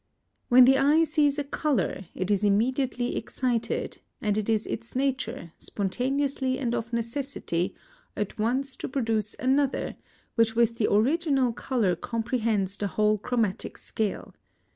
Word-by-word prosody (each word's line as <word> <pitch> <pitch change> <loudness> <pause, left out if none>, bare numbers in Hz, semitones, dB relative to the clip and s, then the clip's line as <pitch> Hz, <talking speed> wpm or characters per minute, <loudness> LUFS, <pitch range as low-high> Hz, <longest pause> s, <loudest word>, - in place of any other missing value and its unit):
When 250 +1 +8
the 270 +1 +5
eye 295 +4 +5
sees 300 -2 +2
a 290 - 0
colour 275 - -1
it 185 +2 -2
is 205 0 +2
immediately 245 +4 +1
excited, 245 -3 -2 0.2
and 210 -2 0
it 215 0 -1
is 220 -1 +1
its 230 +2 -6
nature, 260 - -2
spontaneously 260 +5 -1
and 240 -4 -1
of 230 0 -3
necessity, 235 -7 -2 0.4
at 210 +1 -3
once 260 +5 0
to - - -5
produce 225 -5 0
another, 270 +1 +1 0.4
which 225 -1 +2
with 230 0 +2
the 210 - +2
original 270 +2 +2
colour 225 -7 0
comprehends 220 -2 -1
the 205 - -1
whole 210 +2 +2
chromatic 225 -3 -1
scale. 215 -3 -3
235 Hz, 140 wpm, -27 LUFS, 215-270 Hz, 0.4 s, When